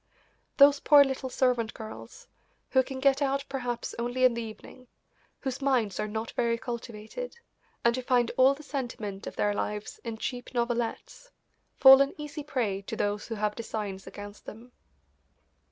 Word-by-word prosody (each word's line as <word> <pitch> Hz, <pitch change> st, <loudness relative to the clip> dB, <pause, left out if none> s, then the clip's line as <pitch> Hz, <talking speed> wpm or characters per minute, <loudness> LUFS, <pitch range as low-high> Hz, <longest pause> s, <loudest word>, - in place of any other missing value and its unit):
Those 280 Hz, 0 st, +7 dB
poor 290 Hz, 0 st, +7 dB
little 265 Hz, -1 st, -3 dB
servant 245 Hz, -4 st, +1 dB
girls, 230 Hz, -, -10 dB, 0.4 s
who 260 Hz, -, +5 dB
can 260 Hz, 0 st, -6 dB
get 275 Hz, +1 st, +3 dB
out 275 Hz, 0 st, 0 dB
perhaps 245 Hz, -3 st, -4 dB
only 245 Hz, +2 st, -1 dB
in 250 Hz, -, +5 dB
the 235 Hz, -, -3 dB
evening, 230 Hz, +3 st, -10 dB, 0.5 s
whose 265 Hz, 0 st, -4 dB
minds 245 Hz, -8 st, +1 dB
are 210 Hz, -, -1 dB
not 220 Hz, +2 st, -4 dB
very 235 Hz, -1 st, 0 dB
cultivated, 235 Hz, -, -7 dB, 0.5 s
and 235 Hz, 0 st, +4 dB
who 255 Hz, -, -3 dB
find 245 Hz, -2 st, +2 dB
all 260 Hz, +2 st, +5 dB
the 300 Hz, -, -13 dB
sentiment 230 Hz, -8 st, -5 dB
of -, -, -7 dB
their 205 Hz, 0 st, +1 dB
lives 210 Hz, 0 st, -4 dB
in 230 Hz, -2 st, -5 dB
cheap 245 Hz, +2 st, -5 dB
novelettes, 240 Hz, -, -2 dB, 0.5 s
fall 265 Hz, 0 st, +9 dB
an 275 Hz, -, +1 dB
easy 300 Hz, 0 st, -6 dB
prey 240 Hz, -10 st, -2 dB
to 195 Hz, -, -6 dB
those 205 Hz, 0 st, -2 dB
who 225 Hz, -, -4 dB
have 210 Hz, 0 st, -1 dB
designs 210 Hz, -4 st, -5 dB
against 205 Hz, 0 st, -10 dB
them. 235 Hz, +3 st, -10 dB
245 Hz, 165 wpm, -28 LUFS, 220-270 Hz, 0.5 s, fall